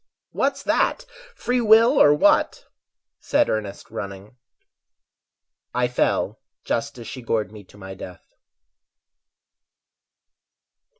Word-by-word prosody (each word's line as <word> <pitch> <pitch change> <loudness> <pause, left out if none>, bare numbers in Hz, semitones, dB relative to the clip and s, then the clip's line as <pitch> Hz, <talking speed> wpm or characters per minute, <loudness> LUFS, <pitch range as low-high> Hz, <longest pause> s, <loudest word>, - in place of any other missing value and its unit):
"What's 275 0 -1
that, 315 - 0 0.3
free 245 0 -1
will 230 +4 +5
or 145 - +7
what?" 150 - +2 0.5
said - - +1
Ernest, 105 -2 -5
running. 100 +2 -8 1.4
I 125 0 +2
fell 125 - -1 0.2
just 115 - -3
as 120 - -9
she 130 +3 -7
gored 110 -4 -2
me 105 -1 -12
to 105 - -19
my 95 -1 -9
death. 90 -1 -12
115 Hz, 105 wpm, -23 LUFS, -, 1.4 s, or